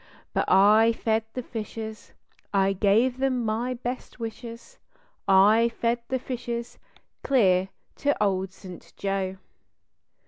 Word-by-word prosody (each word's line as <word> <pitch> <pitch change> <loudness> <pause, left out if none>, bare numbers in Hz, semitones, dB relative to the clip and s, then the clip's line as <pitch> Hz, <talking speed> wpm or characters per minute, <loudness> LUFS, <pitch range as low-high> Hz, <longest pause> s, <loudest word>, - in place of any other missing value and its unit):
But - - +1
I 215 +4 +5
fed 220 -1 0
the 255 - -4
fishes, 220 -1 -7 0.4
I 195 -1 +2
gave 225 +6 +2
them 260 -3 0
my 235 +4 -1
best 250 +1 -6
wishes 230 - -8 0.5
I 210 +4 +5
fed 235 +1 -1
the 260 - 0
fishes 240 -2 -5 0.4
clear 190 -8 +3 0.3
to 285 -6 +1
Old 190 -1 0
St. 185 -2 -12
Joe. 195 -1 -2
225 Hz, 115 wpm, -26 LUFS, 195-240 Hz, 0.5 s, I